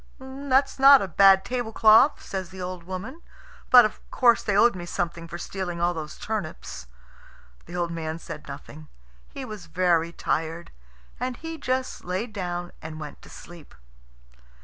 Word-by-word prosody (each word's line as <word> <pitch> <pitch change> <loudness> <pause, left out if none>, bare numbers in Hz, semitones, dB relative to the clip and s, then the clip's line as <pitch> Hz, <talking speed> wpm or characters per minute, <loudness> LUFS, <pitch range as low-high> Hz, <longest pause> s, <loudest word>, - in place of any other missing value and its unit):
"That's 265 +1 0
not 275 -2 +8
a - - -3
bad 195 +2 +5
tablecloth," 230 +2 +4
says 190 -2 -5
the 190 0 -11
old 180 -1 -6
woman; 205 - -7 0.5
"but, 245 -2 +9
of 215 - -4
course, 240 -2 +4
they 205 -2 0
owed 235 0 +5
me 175 -1 -7
something 170 -1 -3
for 170 0 -7
stealing 175 -1 -5
all 175 +1 +1
those 155 -2 -7
turnips." 170 - -5 0.8
The 175 - -8
old 175 -1 -1
man 160 -1 -4
said 165 - -9
nothing. 145 +2 -10 0.4
He 270 - -7
was 210 -7 -9
very 170 -1 +1
tired, 165 0 -3 0.5
and 250 0 -3
he 325 0 -7
just 255 0 -2
laid 190 +6 -4
down 175 -3 -4
and 155 0 -8
went 150 -1 -9
to - - -15
sleep. 170 - -13
185 Hz, 160 wpm, -25 LUFS, 170-240 Hz, 0.8 s, but